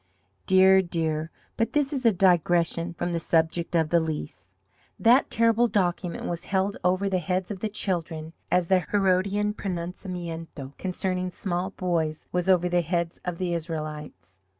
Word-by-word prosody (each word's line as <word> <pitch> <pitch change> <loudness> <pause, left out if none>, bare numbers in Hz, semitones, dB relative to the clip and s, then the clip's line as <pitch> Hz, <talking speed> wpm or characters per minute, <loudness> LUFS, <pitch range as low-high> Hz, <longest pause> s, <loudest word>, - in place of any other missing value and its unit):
Dear, 190 0 +6
dear, 160 -3 -2 0.3
but 225 - 0
this 295 -1 +1
is 260 -4 +1
a - - +6
digression 175 -2 +2
from 175 - -2
the 170 - -1
subject 165 +1 0
of 160 -2 +2
the 170 - +4
Lease. 155 - -5 0.5
That 245 +4 +5
terrible 230 +1 +3
document 180 -4 -1
was 175 0 -4
held 195 +1 0
over 185 +2 +2
the 190 -2 +1
heads 185 +3 -2
of 195 - -5
the 215 - -2
children 165 -6 -3 0.2
as 180 -1 +2
the 190 0 +4
Herodian 200 +2 +1
pronunciamento 170 -6 -6
concerning 185 0 -2
small 180 -1 -3
boys 165 -5 -2
was 180 +1 0
over 180 -1 +4
the 175 0 +2
heads 170 0 -2
of 175 -1 -3
the 180 -1 -1
Israelites. 150 - -6
180 Hz, 155 wpm, -26 LUFS, 165-190 Hz, 0.5 s, Dear